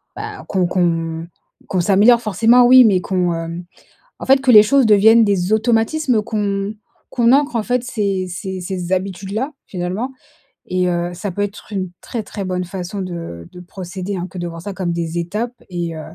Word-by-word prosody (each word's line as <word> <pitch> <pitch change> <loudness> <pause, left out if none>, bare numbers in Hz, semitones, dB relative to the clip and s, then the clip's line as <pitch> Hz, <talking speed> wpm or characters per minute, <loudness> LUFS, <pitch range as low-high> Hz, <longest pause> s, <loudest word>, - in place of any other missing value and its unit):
bah, - - -7
qu'on 185 -2 +1
qu'on 165 -2 -1 0.4
qu'on 185 - -1
s'améliore 210 +6 +5
forcément 230 +3 +4
oui, 255 +1 +8
mais 200 -5 +4
qu'on, 180 -2 0
hem, 165 +1 -5 0.6
en - - -6
fait, 270 +1 +5
que 265 -1 +2
les 210 -2 +10
choses 270 +3 +3
deviennent 220 +2 +6
des 195 -2 0
automatismes 225 +3 +1
qu'on 205 -1 -2 0.4
qu'on 235 -1 +3
ancre 280 -2 +2
en 225 - +1
fait, 250 +2 -1
ces 200 -6 -2
ces 190 +1 -5
ces 180 0 -4
habitudes-là, 195 - -2
finalement 190 +8 -4 0.6
et 180 0 0
heu, 175 0 -1
ça 185 +4 -5
peut 205 - -4
être 205 +1 -7
une 190 -3 -3
très 230 -3 -5
très 200 0 -6
bonne 180 -1 -2
façon 185 +2 -6
de 170 - -7
de 180 - -12
procéder 185 +2 -6
hein, 180 0 -4
que 185 - -8
de 175 - -3
voir 165 -1 -8
ça 200 - -5
comme 185 -2 -3
des 170 0 -3
étapes 210 +8 -3 0.2
et 170 -2 -4
heu, 160 - -6
195 Hz, 190 wpm, -19 LUFS, 175-220 Hz, 0.6 s, les